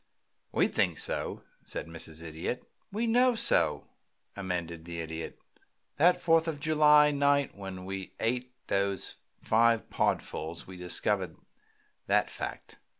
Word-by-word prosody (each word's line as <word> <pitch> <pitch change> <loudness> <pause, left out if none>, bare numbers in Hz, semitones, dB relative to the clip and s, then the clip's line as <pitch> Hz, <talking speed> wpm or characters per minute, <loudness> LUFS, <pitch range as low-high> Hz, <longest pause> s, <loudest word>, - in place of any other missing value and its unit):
"We - - +3
think - - +1
so," - - -2 0.2
said - - -4
Mrs. 80 -1 -8
Idiot. 80 +9 -4 0.3
"We 220 +4 -1
know 245 +2 +4
so," 85 - +3 0.5
amended 85 -4 -4
the 85 0 -6
Idiot. 80 0 -5 0.6
"That 180 +4 +5
Fourth 165 -1 +3
of 155 -3 -2
July 150 -1 +5
night 140 -1 +2
when 95 -2 -7
we 95 0 -6
ate 125 +2 -1
those 100 0 -1 0.2
five 115 0 +3
podfuls 80 +2 -1
we 95 - -10
discovered 90 -1 -1 0.7
that - - +2
fact. - - -7
100 Hz, 125 wpm, -30 LUFS, -, 0.7 s, That